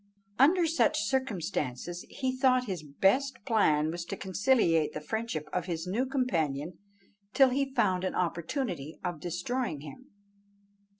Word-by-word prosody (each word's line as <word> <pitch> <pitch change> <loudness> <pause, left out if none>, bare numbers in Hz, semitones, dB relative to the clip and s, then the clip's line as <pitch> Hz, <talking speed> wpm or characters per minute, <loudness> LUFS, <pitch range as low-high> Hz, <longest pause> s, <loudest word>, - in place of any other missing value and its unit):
Under 335 +6 +5
such 325 +1 +2
circumstances 175 - -2
he 260 -1 -2
thought 255 -1 +3
his 185 -7 -4
best 195 - +1
plan 160 - +3
was 170 +1 -4
to 195 - -5
conciliate 190 - +2
the - - -4
friendship 165 -3 -3
of 180 -2 -1
his 165 -1 -3
new 225 +9 -1
companion 170 - -1 0.6
till 270 -1 +7
he 270 +1 -1
found 185 -2 +2
an 185 - -2
opportunity 170 - -2
of 175 -4 -3
destroying 180 - -3
him. 155 - -11
185 Hz, 135 wpm, -30 LUFS, 165-255 Hz, 0.6 s, till